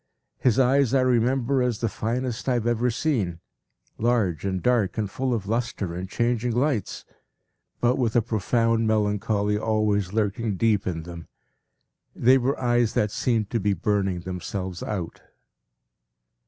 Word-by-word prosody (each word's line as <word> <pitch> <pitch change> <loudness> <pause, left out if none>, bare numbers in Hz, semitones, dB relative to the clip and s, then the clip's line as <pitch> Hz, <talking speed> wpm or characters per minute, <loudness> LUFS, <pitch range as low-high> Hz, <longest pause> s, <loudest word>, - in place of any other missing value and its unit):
His 125 -2 +2
eyes 135 0 +3
I 130 - +4
remember 130 +1 +2
as 125 -3 0
the 115 - -1
finest 120 +3 -3
I - - +3
have 120 -2 -1
ever 120 +1 +1
seen, 110 - -1 0.6
large 110 -9 +1
and 95 -1 -1
dark 115 -1 +1
and 110 -2 0
full 130 +6 -2
of 110 -5 -1
lustre 110 -5 -2
and 90 +2 -5
changing 120 +1 0
lights, 125 -3 -1 0.8
but 120 +2 +2
with 115 -3 0
a 120 - +5
profound 115 +1 +1
melancholy 105 -1 +1
always 105 -3 0
lurking 105 0 -1
deep 105 0 +1
in 80 -3 -3
them. 85 -1 -9 0.9
They 130 +3 +5
were 130 +3 -1
eyes 120 -2 +1
that 105 -1 +1
seemed 110 -4 0
to 115 - 0
be 100 0 +1
burning 95 0 0
themselves 90 0 -5
out. 90 -6 -5
110 Hz, 150 wpm, -25 LUFS, 100-120 Hz, 0.9 s, a